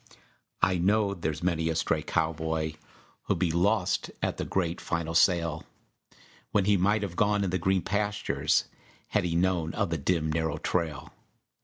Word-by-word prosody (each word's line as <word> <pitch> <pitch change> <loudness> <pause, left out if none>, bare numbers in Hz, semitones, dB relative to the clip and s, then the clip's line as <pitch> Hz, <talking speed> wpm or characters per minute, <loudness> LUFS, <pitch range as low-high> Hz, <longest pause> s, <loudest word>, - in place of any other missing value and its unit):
I 90 0 +3
know 100 +2 +2
there's 80 -4 -3
many 80 -2 +1
a 80 - -1
stray 80 -1 0
cowboy 80 -1 -1 0.5
Who'll - - +2
be 85 -1 +1
lost 90 +1 +1
at - - -1
the - - -3
great, 90 -2 -1
final 80 -1 -2
sale, 85 -2 +3 0.9
When 100 - +2
he 105 0 +4
might 105 +3 +2
have 90 -4 -4
gone 105 +1 +2
in 95 - -1
the 95 - 0
green 95 +1 +1
pastures 105 0 0 0.5
Had - - +1
he 85 -1 -1
known 85 -2 +1
of 100 -5 0
the 85 - -1
dim, 80 +1 0
narrow 80 -1 -1
trail. 80 -2 -2
85 Hz, 165 wpm, -28 LUFS, 80-95 Hz, 0.9 s, he